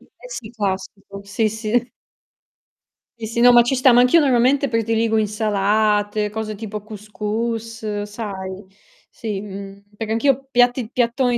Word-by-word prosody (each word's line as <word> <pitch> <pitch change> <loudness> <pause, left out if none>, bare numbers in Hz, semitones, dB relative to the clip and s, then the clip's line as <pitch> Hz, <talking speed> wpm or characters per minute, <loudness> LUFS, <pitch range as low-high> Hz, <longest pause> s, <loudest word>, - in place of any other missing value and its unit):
Eh - - -16
sì, 230 - -7
classico, 200 -2 -5
sì, 215 +2 0
sì. 220 +3 -1 1.3
Sì, 220 -1 -5
sì, 230 +1 -3
no 245 +1 +7
ma 240 - +8
ci 255 +3 0
sta, 255 0 +5
ma 245 - +7
anch'io 250 +7 +5
normalmente 270 0 +3
prediligo 230 -1 0
insalate, 210 0 +1
cose 215 0 -4
tipo 210 0 -6
cous 215 -1 -11
cous 220 0 -3
sai? 200 -2 -6 0.4
Sì, 215 -4 -5
mhmm, 200 0 -9
perché 220 +1 -5
anch'io 270 +3 +1
piatti 245 -1 +2
piattoni 245 0 +1
220 Hz, 140 wpm, -21 LUFS, 210-240 Hz, 1.3 s, ma